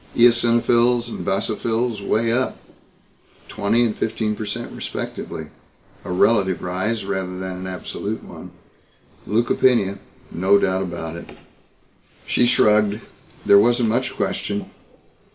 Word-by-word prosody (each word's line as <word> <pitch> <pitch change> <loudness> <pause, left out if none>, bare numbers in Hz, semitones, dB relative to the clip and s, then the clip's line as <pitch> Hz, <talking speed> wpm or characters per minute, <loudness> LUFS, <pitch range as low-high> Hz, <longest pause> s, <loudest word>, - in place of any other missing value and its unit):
Eosinophils 120 0 +4
and - - -6
basophils 110 +3 -1
way 115 +3 +1
up 130 +2 0 0.9
twenty 110 +4 +1
and 110 - -1
fifteen 110 -1 -2
per 105 0 -6
cent - - -4
respectively - - -6 0.5
a - - -6
relative 95 0 +2
rise 95 +4 -2
rather 95 -2 -3
than 95 - -5
an 90 +1 -6
absolute 90 -1 -5
one - - -10 0.8
leukopenia, 115 -2 +2 0.3
no 95 +4 +3
doubt 95 -1 +1
about 85 -3 -5
it. 85 - -11 0.9
She 120 - +2
shrugged. 105 -2 +3 0.5
There 100 - +7
wasn't 120 +1 +3
much 125 +3 -1
question. 100 0 -3
105 Hz, 115 wpm, -21 LUFS, 95-120 Hz, 0.9 s, There